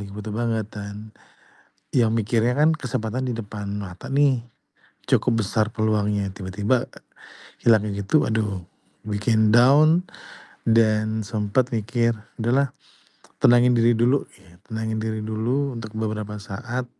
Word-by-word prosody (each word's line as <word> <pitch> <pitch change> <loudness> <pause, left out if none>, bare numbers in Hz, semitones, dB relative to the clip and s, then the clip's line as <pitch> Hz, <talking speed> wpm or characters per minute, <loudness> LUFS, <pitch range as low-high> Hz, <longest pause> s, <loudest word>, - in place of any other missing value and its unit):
lagi - - -11
butuh 105 0 -6
banget 115 -2 -1
dan, 100 -1 -7 1.0
ya 120 -2 +4
mikirnya 115 +2 +1
kan 155 +2 +5
kesempatan 130 -3 -3
di 120 - -1
depan 105 -2 -6
mata 95 -3 -8
nih, 135 -3 +3 0.7
cukup 115 - +2
besar 110 +2 0
peluangnya, 105 -2 0
tiba-tiba, 105 +6 -1
e - - -16 0.7
hilangnya 105 -3 +3
gitu 145 +10 +3
aduh, 105 -4 -1 0.4
bikin 110 +1 +2
down 155 +8 +5 0.6
dan 110 -1 +2
sempet 105 +5 0
mikir, 115 +1 +1 0.3
udahlah 130 +4 +2 0.7
tenangin 120 +1 +5
diri 115 +1 +4
dulu 125 +5 +2
git 90 -2 -21
tenangin 110 0 -3
diri 110 0 -2
dulu 120 +5 -1
untuk 115 -2 -7
beberapa 105 -1 -3
saat, 120 +5 -5
110 Hz, 125 wpm, -23 LUFS, 105-120 Hz, 1.0 s, kan